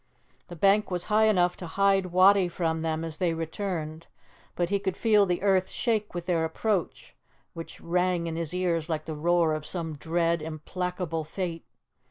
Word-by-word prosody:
The 175 Hz, -, -9 dB
bank 200 Hz, +4 st, +3 dB
was 180 Hz, -2 st, -1 dB
high 220 Hz, +1 st, +5 dB
enough 180 Hz, -4 st, +3 dB
to 175 Hz, -, -7 dB
hide 195 Hz, +2 st, +2 dB
Wattie 185 Hz, +1 st, +5 dB
from 165 Hz, -2 st, -2 dB
them 160 Hz, 0 st, -1 dB
as 160 Hz, -1 st, -5 dB
they 170 Hz, -3 st, 0 dB
returned, 165 Hz, -1 st, -4 dB, 0.5 s
but 175 Hz, +1 st, -1 dB
he 200 Hz, -, +2 dB
could 190 Hz, -2 st, -3 dB
feel 210 Hz, -3 st, +4 dB
the 180 Hz, +1 st, -1 dB
earth 190 Hz, -2 st, +3 dB
shake 220 Hz, -6 st, -1 dB
with 175 Hz, -1 st, -4 dB
their 170 Hz, -3 st, +1 dB
approach, 185 Hz, +3 st, -2 dB, 0.4 s
which 165 Hz, 0 st, -8 dB
rang 180 Hz, 0 st, 0 dB
in 165 Hz, -1 st, -3 dB
his 165 Hz, -2 st, -2 dB
ears 175 Hz, -3 st, -1 dB
like 155 Hz, -1 st, -2 dB
the 160 Hz, -, -4 dB
roar 165 Hz, +1 st, +2 dB
of 155 Hz, -1 st, -3 dB
some 160 Hz, -1 st, -4 dB
dread, 170 Hz, +2 st, 0 dB
implacable 165 Hz, +1 st, -4 dB
fate. 165 Hz, +1 st, -5 dB
175 Hz, 180 wpm, -27 LUFS, 160-190 Hz, 0.5 s, high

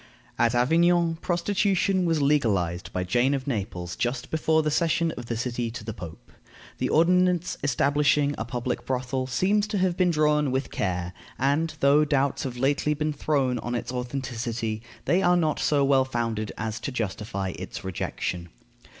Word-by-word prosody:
At 120 Hz, +1 st, +3 dB
Avignon 165 Hz, +6 st, +3 dB
prostitution 190 Hz, +1 st, +1 dB
was 165 Hz, -4 st, +1 dB
legalized 100 Hz, -, +1 dB
by 90 Hz, -, -2 dB
Jane 125 Hz, +9 st, +2 dB
of 130 Hz, -1 st, -4 dB
Naples 95 Hz, -8 st, -3 dB
just 120 Hz, +1 st, -2 dB
before 160 Hz, 0 st, +2 dB
the 150 Hz, -, 0 dB
cession 165 Hz, +1 st, +1 dB
of 120 Hz, -5 st, -8 dB
the 115 Hz, -, -2 dB
city 120 Hz, 0 st, -2 dB
to 115 Hz, -1 st, -7 dB
the 110 Hz, 0 st, -5 dB
Pope. 85 Hz, -6 st, -10 dB, 0.5 s
The -, -, 0 dB
ordinance 180 Hz, +1 st, +3 dB
establishing 145 Hz, +1 st, +2 dB
a -, -, -3 dB
public 120 Hz, +1 st, -3 dB
brothel 130 Hz, 0 st, -2 dB
seems 200 Hz, -, +1 dB
to 210 Hz, -1 st, -2 dB
have 185 Hz, -2 st, +1 dB
been 180 Hz, 0 st, +2 dB
drawn 150 Hz, -2 st, +2 dB
with 130 Hz, +1 st, -2 dB
care, 90 Hz, -2 st, -2 dB, 0.2 s
and, 145 Hz, +4 st, +1 dB
though 140 Hz, +2 st, +5 dB
doubts 140 Hz, -2 st, 0 dB
have 125 Hz, -2 st, -4 dB
lately 145 Hz, +3 st, +1 dB
been 150 Hz, +1 st, -1 dB
thrown 135 Hz, -5 st, 0 dB
on 120 Hz, +2 st, -3 dB
its 120 Hz, +1 st, -3 dB
authenticity, 120 Hz, -3 st, -3 dB, 0.2 s
they 180 Hz, +3 st, +3 dB
are 180 Hz, -1 st, +4 dB
not 155 Hz, -3 st, +1 dB
so 145 Hz, -2 st, +2 dB
well 135 Hz, -1 st, +4 dB
founded 115 Hz, -4 st, -2 dB
as 110 Hz, 0 st, -3 dB
to 125 Hz, -, -4 dB
justify 100 Hz, -4 st, -3 dB
its -, -, -7 dB
rejection. 90 Hz, -1 st, -4 dB
135 Hz, 165 wpm, -26 LUFS, 115-155 Hz, 0.5 s, though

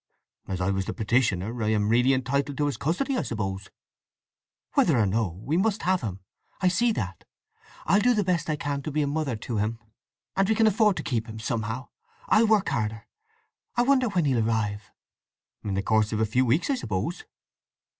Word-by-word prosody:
"As 95 Hz, -1 st, -3 dB
I 95 Hz, +2 st, +1 dB
was 95 Hz, -1 st, -1 dB
the -, -, -4 dB
petitioner, 115 Hz, -1 st, 0 dB
I -, -, 0 dB
am 105 Hz, -1 st, +2 dB
really 125 Hz, +3 st, +4 dB
entitled 140 Hz, +2 st, 0 dB
to 150 Hz, -, +1 dB
his 145 Hz, -, -1 dB
custody, 220 Hz, -, -1 dB
I -, -, +1 dB
suppose." 95 Hz, -3 st, -4 dB, 1.0 s
"Whether 155 Hz, -7 st, +4 dB
or 110 Hz, -, +3 dB
no, 95 Hz, -3 st, -1 dB
we 155 Hz, +5 st, 0 dB
must 205 Hz, +2 st, +1 dB
have 185 Hz, 0 st, +2 dB
him. 100 Hz, -5 st, -5 dB, 0.4 s
I 185 Hz, -, +3 dB
see 235 Hz, +6 st, +2 dB
that. 95 Hz, -, -4 dB, 0.6 s
I'll 195 Hz, +6 st, +4 dB
do 245 Hz, +3 st, +3 dB
the 210 Hz, -, +2 dB
best 175 Hz, -4 st, 0 dB
I 155 Hz, -, +1 dB
can 145 Hz, -1 st, -3 dB
to 155 Hz, -, -5 dB
be 150 Hz, +1 st, +1 dB
a -, -, -1 dB
mother 145 Hz, -3 st, -1 dB
to 110 Hz, +1 st, -4 dB
him, 110 Hz, +2 st, -1 dB, 0.6 s
and 195 Hz, +1 st, +2 dB
we 220 Hz, -, +3 dB
can 225 Hz, -, +4 dB
afford 210 Hz, -2 st, +3 dB
to -, -, -3 dB
keep 115 Hz, -3 st, -2 dB
him 110 Hz, -, -7 dB
somehow. 115 Hz, +3 st, -3 dB, 0.4 s
I'll 225 Hz, +1 st, +5 dB
work 215 Hz, -2 st, +3 dB
harder. 110 Hz, 0 st, -2 dB, 0.7 s
I 240 Hz, -, +3 dB
wonder 260 Hz, -1 st, +3 dB
when 180 Hz, -5 st, +1 dB
he'll 125 Hz, -5 st, +2 dB
arrive?" 105 Hz, -2 st, -1 dB, 0.7 s
"In 100 Hz, -2 st, -2 dB
the 95 Hz, -, -1 dB
course 110 Hz, 0 st, +2 dB
of 110 Hz, -, -1 dB
a 110 Hz, -, +3 dB
few 125 Hz, +4 st, +1 dB
weeks, 150 Hz, -, +2 dB
I -, -, +2 dB
suppose." 105 Hz, -, -3 dB
125 Hz, 205 wpm, -26 LUFS, 110-180 Hz, 1.0 s, I'll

